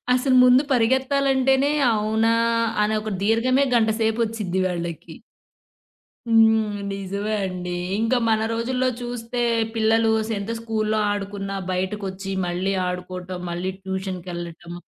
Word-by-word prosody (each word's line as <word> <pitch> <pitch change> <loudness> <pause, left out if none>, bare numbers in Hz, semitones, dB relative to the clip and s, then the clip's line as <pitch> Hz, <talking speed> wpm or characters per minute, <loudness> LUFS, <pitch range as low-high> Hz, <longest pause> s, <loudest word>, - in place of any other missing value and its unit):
అసలు 255 0 +2
ముందు 250 +2 +6
పరిగెత్తాలంటేనే 265 +2 +2 0.2
అవునా? 220 +2 +1 0.5
అనే 215 +1 +1
ఒక 215 0 -5
దీర్ఘమే 245 +5 +3
గంటసేపొచ్చిద్ది 220 -3 0
వాళ్ళకి. 170 -2 -5 1.1
హ్మ్. 220 -2 +4
నిజమే 200 +2 -3
అండి. 180 -1 -4 0.2
ఇంకా 225 +3 +1
మన 220 -1 +2
రోజుల్లో 250 +3 0
చూస్తే 240 0 -4 0.3
పిల్లలు 225 0 +3
అసలేంత 215 -1 -3
స్కూల్‌లో 220 -1 -1
ఆడుకున్నా, 195 -1 -4 0.2
బయటకొచ్చి 195 +1 -3 0.2
మళ్ళీ 185 +3 -1
ఆడుకోవటం, 180 0 -5
మళ్ళీ 180 +2 -3
ట్యూషన్‌కెళ్ళటం. 180 -3 -6
215 Hz, 100 wpm, -23 LUFS, 190-230 Hz, 1.1 s, ముందు